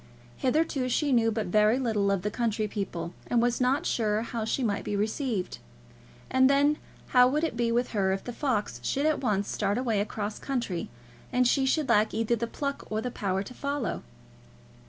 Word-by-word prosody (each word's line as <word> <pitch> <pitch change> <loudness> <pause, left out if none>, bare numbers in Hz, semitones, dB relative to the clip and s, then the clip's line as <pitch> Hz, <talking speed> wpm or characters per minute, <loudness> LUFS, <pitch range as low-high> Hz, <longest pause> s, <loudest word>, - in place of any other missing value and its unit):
Hitherto 270 -1 +1
she 285 +3 +1
knew 230 -3 +3
but 220 0 -2
very 215 +5 +3
little 220 -6 +1
of 195 -2 0
the 210 - -1
county 220 -2 -1
people, 180 -5 -4
and 240 - +2
was 240 +1 +1
not 270 +6 +2
sure 215 -1 +1
how 230 -1 -3
she 255 +4 -1
might 205 -4 0
be 205 - -2
received; 215 -1 -2 0.7
and 260 0 +5
then 285 +2 +3 0.3
how 250 -1 +6
would 300 +5 0
it 325 - -1
be 235 0 +1
with 240 +1 +1
her 195 -3 +1
if 195 0 -2
the 245 - -6
fox 215 - -1
should 280 - 0
at 310 -1 +2
once 205 -5 0
start 200 +1 -1
away 235 -5 0
across 210 0 -4
country, 235 -10 -3 0.4
and 250 0 +3
she 265 +1 +2
should 300 +1 +1
lack 210 +1 +3
either 225 +1 +1
the 235 +1 -2
pluck 280 +3 -4
or 215 - -1
the 245 +3 -3
power 195 -3 -1
to 250 - -10
follow? 280 -6 -3
230 Hz, 200 wpm, -28 LUFS, 210-260 Hz, 0.7 s, how